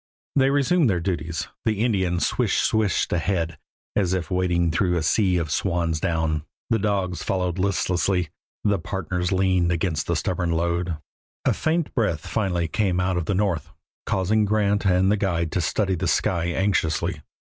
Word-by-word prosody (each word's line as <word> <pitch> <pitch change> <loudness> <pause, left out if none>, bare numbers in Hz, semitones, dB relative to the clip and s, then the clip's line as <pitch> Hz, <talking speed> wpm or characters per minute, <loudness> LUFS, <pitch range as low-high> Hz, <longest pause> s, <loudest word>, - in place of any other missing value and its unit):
They 135 -1 +4
resumed 145 +1 +3
their 90 -3 +1
duties; 85 -2 -3 0.2
the 110 -1 0
Indian 95 -6 +1
"swish - - +1
swished" 110 -5 +1
ahead, 85 -2 -1 0.4
as 95 -3 +1
if 90 -3 -4
wading 90 -2 +1
through 90 +1 +1
a 80 - -1
sea 95 +2 +2
of 80 -3 -2
swan's 85 -3 0
down; 80 -3 0 0.3
the 115 - +3
dogs 95 -3 -1
followed 90 -1 -1
listlessly; 90 -2 +1 0.3
the 100 -2 +2
partners 90 0 -3
leaned 95 -2 +2
against 85 -3 -1
the 85 - +1
stubborn 90 0 -1
load. 85 0 -1 0.5
A - - +4
faint 160 0 -1
breath 85 - 0
finally 90 -6 -1
came 95 -1 0
out 90 0 +1
of 85 -2 -1
the 100 - 0
north, 95 -5 0 0.4
causing 105 +3 +2
Grant 105 -1 +1
and 95 +1 +3
the 105 - +2
guide 85 -5 0
to 90 - 0
study 95 +4 0
the 90 0 -1
sky 85 +1 +1
anxiously. 85 -3 0
90 Hz, 165 wpm, -24 LUFS, 85-100 Hz, 0.5 s, They